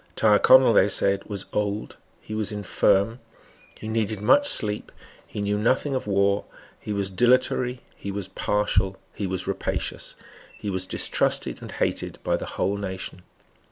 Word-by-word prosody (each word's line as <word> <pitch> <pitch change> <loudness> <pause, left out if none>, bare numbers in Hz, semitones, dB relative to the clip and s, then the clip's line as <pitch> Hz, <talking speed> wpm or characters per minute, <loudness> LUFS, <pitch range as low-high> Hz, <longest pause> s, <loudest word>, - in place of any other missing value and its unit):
Tyrconnel, 115 +3 +6
they 100 -1 +5
said, 100 -1 +2
was 100 -2 -5
old; 105 0 -2 0.3
he 110 - -8
was 110 -1 -2
infirm; 105 +2 +1 0.6
he 110 - -9
needed 110 -2 -1
much 285 - +4
sleep; 105 -1 -1 0.4
he 105 - -5
knew 105 0 0
nothing 130 +6 +1
of 130 -4 -2
war; 100 0 +2 0.4
he - - -6
was 100 -1 -1
dilatory; 125 +4 +2
he 100 - -7
was 100 -1 -4
partial; 95 -2 0 0.2
he 100 - -3
was 95 -1 -3
rapacious; - - -3 0.4
he 105 - -4
was 95 0 -3
distrusted - - -1
and - - -8
hated - - -2
by - - +1
the - - -5
whole 100 +1 0
nation. 95 -2 -5
105 Hz, 155 wpm, -25 LUFS, 100-110 Hz, 0.6 s, Tyrconnel